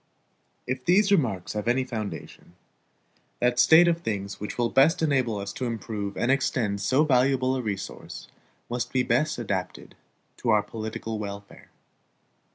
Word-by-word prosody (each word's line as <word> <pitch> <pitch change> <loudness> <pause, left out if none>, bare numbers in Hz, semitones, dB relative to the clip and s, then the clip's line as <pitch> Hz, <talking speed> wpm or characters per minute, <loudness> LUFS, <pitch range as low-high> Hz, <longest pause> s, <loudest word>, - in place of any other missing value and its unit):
If 130 0 -3
these 195 +6 +3
remarks 115 - +1
have 105 +1 -4
any 125 +2 +2
foundation, 110 -7 -7 0.8
that 125 0 +1
state 160 +6 +7
of 170 0 +1
things 100 - -4
which 105 - -6
will 120 -1 0
best 160 +6 +4
enable 130 -8 +1
us 100 0 -5
to 130 - -4
improve 105 -3 -4
and 120 - +1
extend 125 -7 0
so 130 +8 +3
valuable 130 -2 +2
a 130 - -2
resource 100 -4 -6 0.4
must 120 +1 -3
be 130 -1 +1
best 130 +6 +1
adapted 95 -6 -4 0.4
to 120 - -3
our 105 -2 +4
political 110 0 -5
welfare. 100 -1 -8
120 Hz, 150 wpm, -26 LUFS, 105-130 Hz, 0.8 s, state